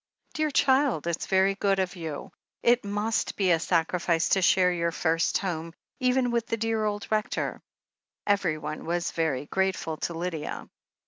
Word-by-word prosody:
"Dear 310 -1 0
child, 265 - +2
it's 170 -1 -2
very 190 +1 +3
good 195 0 +1
of 185 -1 -1
you 160 -4 -6 0.2
— - - -52
it 245 +1 +2
must 210 +2 -1
be 190 -3 +2
a 165 - +4
sacrifice 170 0 +1
to 195 - +3
share 180 0 +4
your 170 -1 0
first 165 0 +1
home, 165 -3 -4 0.2
even 255 -1 +2
with 235 -1 0
the 230 - -1
dear 225 -1 0
old 205 -1 -2
Rector 215 -1 -1 0.3
" - - -65 0.3
Everyone 165 -6 -1
was 175 +1 -1
very 155 -5 -1
grateful 190 -3 -1
to 170 - -3
Lydia. 165 -2 -4
185 Hz, 170 wpm, -27 LUFS, 165-215 Hz, 0.3 s, a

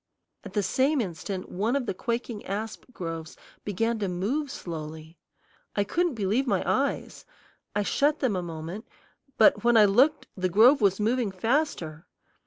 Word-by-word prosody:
At - - -10
the 205 - +1
same 265 +9 +2
instant 185 -1 -4
one 215 +8 0
of 275 -3 0
the - - -2
quaking 235 +1 -3
asp 215 +3 -4
groves 165 -6 -6 0.3
began 225 +3 -1
to 200 - -1
move 215 +12 -1
slowly. 160 - -7 0.6
I 205 - +2
couldn't 340 - 0
believe 220 +6 0
my - - +1
eyes. - - -1 0.5
I 205 - +2
shut 290 +8 +2
them 255 -9 0
a 180 - -1
moment, 170 +5 -7 0.5
but 210 -2 +5
when 240 -1 +5
I 215 - +8
looked 250 +10 +3
the 185 -1 -1
grove 235 - +6
was 195 -1 +3
moving 230 +1 +1
faster. 190 - -1
210 Hz, 160 wpm, -27 LUFS, 185-245 Hz, 0.6 s, I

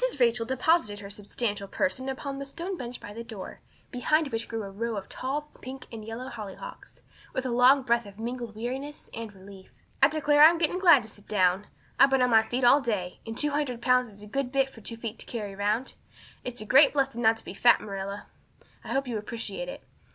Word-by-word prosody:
Rachel 235 -1 +3
deposited 260 -4 +2
her 200 0 -8
substantial 205 0 -3
person 270 +3 -1
upon 275 +1 -4
the 275 - -5
stone 340 +6 -4
bench 245 -6 -6
by 205 - -9
the 230 +2 -6
door, 220 -5 -8 0.3
behind 305 +4 +1
which 225 -2 -3
grew 225 -1 -4
a 195 - -7
row 230 +3 -3
of 195 - -6
tall 295 +3 -4
pink 260 +1 -8
and 225 -2 -7
yellow 225 +4 -6
hollyhocks, 220 - -9 0.3
with 260 - -2
a 255 - -1
long 255 +3 +6
breath 235 -2 +1
of 200 0 -13
mingled 235 -1 -5
weariness 265 +6 -5
and 230 -2 -6
relief. 190 0 -13 0.3
"I 270 - +9
declare 300 -1 +4
I'm 335 +2 +8
getting 335 +2 +1
glad 340 -9 +7
to 220 - -11
sit 205 - -17
down. 190 -1 +2 0.3
I've 275 - +8
been 270 -1 +3
on 250 - +2
my 220 -1 +7
feet 245 +3 -3
all 275 +4 +6
day, 200 -8 -2
and 225 +1 -5
two 295 -1 +1
hundred 285 -5 -1
pounds 250 0 +3
is 205 0 -12
a - - -8
good 250 +4 -2
bit 270 0 +1
for 225 - -14
two 230 +2 -5
feet 225 -1 -6
to - - -7
carry 210 -4 -5
round. 210 +6 -1 0.5
It's 245 -2 -5
a - - -6
great 275 +5 +7
blessing 270 -4 0
not 225 0 +4
to - - -14
be - - -7
fat, 240 +4 +5
Marilla. 200 0 -5 0.6
I - - -5
hope 270 0 0
you 230 -3 -2
appreciate 235 - -5
it. - - -8
240 Hz, 225 wpm, -28 LUFS, 215-270 Hz, 0.6 s, I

